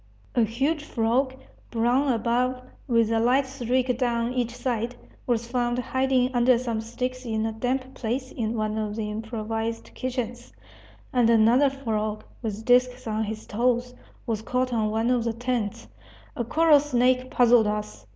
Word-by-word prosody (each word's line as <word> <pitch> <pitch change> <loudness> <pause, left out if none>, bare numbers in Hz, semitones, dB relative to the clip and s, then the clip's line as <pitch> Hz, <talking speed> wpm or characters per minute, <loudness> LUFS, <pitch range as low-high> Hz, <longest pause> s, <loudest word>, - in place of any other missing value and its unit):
A 240 - +3
huge 275 +8 0
frog, 255 +1 0 0.3
brown 245 +4 +2
above, 245 +2 0 0.3
with 230 -3 +3
a 225 - +2
light 255 +4 +3
streak 255 -1 0
down 235 -1 0
each 240 -1 -1
side, 240 -1 -2 0.3
was 235 -2 +1
found 240 0 0
hiding 260 0 +1
under 245 0 +4
some 235 -3 -2
sticks 250 +3 -4
in 220 -2 -1
a 225 - -1
damp 255 +4 -2
place 255 +3 -3
in 225 -1 -2
one 215 0 -1
of 210 -1 -3
the 215 -1 -3
improvised 225 +1 -4
kitchens; 245 -2 -4 0.6
and 245 -3 +4
another 235 +5 +5
frog, 215 -6 -3 0.2
with 220 -1 -4
disks 250 0 +3
on 220 0 -1
his 215 +1 -6
toes, 245 +2 0 0.3
was 225 -3 -2
caught 255 +2 -1
on 220 -2 +1
one 225 +3 +1
of 245 -2 +2
the 230 -1 -1
tents. 235 -3 -3 0.5
A 240 - -1
coral 310 +4 +5
snake 255 -2 +1
puzzled 240 -3 +5
us. 160 - -4
240 Hz, 160 wpm, -25 LUFS, 225-255 Hz, 0.6 s, another